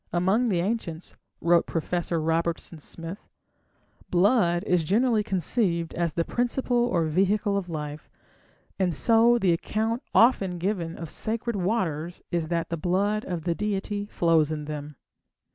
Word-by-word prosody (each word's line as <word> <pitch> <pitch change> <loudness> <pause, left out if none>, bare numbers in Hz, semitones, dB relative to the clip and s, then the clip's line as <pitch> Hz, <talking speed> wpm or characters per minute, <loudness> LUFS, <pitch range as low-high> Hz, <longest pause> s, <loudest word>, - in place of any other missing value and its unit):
"Among 190 +8 +2
the 180 -4 +1
ancients", 180 -5 -3 0.3
wrote 170 0 +3
Professor 170 0 -1
Robertson 165 +1 -1
Smith, 165 +5 -8 0.8
"blood 175 -2 +3
is 180 -2 +2
generally 220 +6 +2
conceived 180 -3 0
as 170 -2 -1
the 165 - 0
principle 245 0 0
or 170 -8 +1
vehicle 195 +6 +1
of 195 -3 -2
life, 150 -2 -6 0.7
and 180 -4 +1
so 230 +6 +4
the 190 -6 +3
account 220 +7 -1
often 195 -7 +4
given 175 -2 -2
of 165 -2 -6
sacred 230 +1 -2
waters 175 -5 -1
is 170 -2 -1
that 170 0 -1
the 170 - -2
blood 200 +6 0
of 175 -3 -4
the 170 0 0
deity 205 +1 -2
flows 165 -5 +2
in 150 -1 -4
them. 150 -1 -6
180 Hz, 145 wpm, -26 LUFS, 165-210 Hz, 0.8 s, so